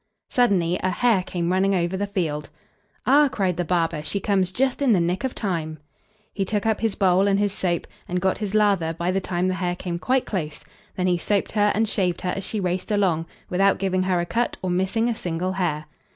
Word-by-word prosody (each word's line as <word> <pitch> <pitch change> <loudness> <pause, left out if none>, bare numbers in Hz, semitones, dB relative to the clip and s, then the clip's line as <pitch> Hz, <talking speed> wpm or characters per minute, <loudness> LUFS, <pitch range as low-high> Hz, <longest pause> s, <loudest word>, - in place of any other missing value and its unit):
Suddenly 185 -8 +2
a 185 - +1
hare 225 +1 +2
came 175 -1 -2
running 195 +1 +2
over 175 +1 0
the 200 +2 -2
field. 160 -7 -2 0.6
"Ah!" 290 +2 +6
cried 185 -4 0
the 175 - -1
barber, 165 -2 0
"she 175 +6 -2
comes 190 -2 +1
just 260 +6 0
in 265 -5 +4
the 190 - +3
nick 175 +5 0
of 265 - -2
time." 165 -6 -3 0.6
He 200 - -1
took 205 +2 -1
up 220 -1 +1
his 225 -3 0
bowl 190 0 +3
and 195 -1 +3
his 205 -1 +1
soap, 175 -4 -1 0.2
and 180 0 -1
got 190 +1 0
his 210 -1 -3
lather 195 -6 +2
by 170 +2 -1
the 195 +1 0
time 180 0 -1
the 185 - +1
hare 180 -1 -1
came 175 -1 -4
quite 255 +6 +1
close, 155 -7 -4 0.3
then 180 - -1
he 180 -1 +2
soaped 200 +3 0
her 210 -1 +3
and 220 +1 +2
shaved 180 -4 0
her 180 - -1
as 195 - -4
she 215 - -3
raced 180 -1 -2
along, 185 -6 +1 0.2
without 195 +2 +3
giving 185 -1 0
her 185 -1 +1
a 175 - 0
cut 235 +6 -1
or 185 - -1
missing 190 +6 +1
a 240 - +1
single 180 -2 -3
hair. 170 -5 -1
185 Hz, 225 wpm, -24 LUFS, 175-205 Hz, 0.6 s, Ah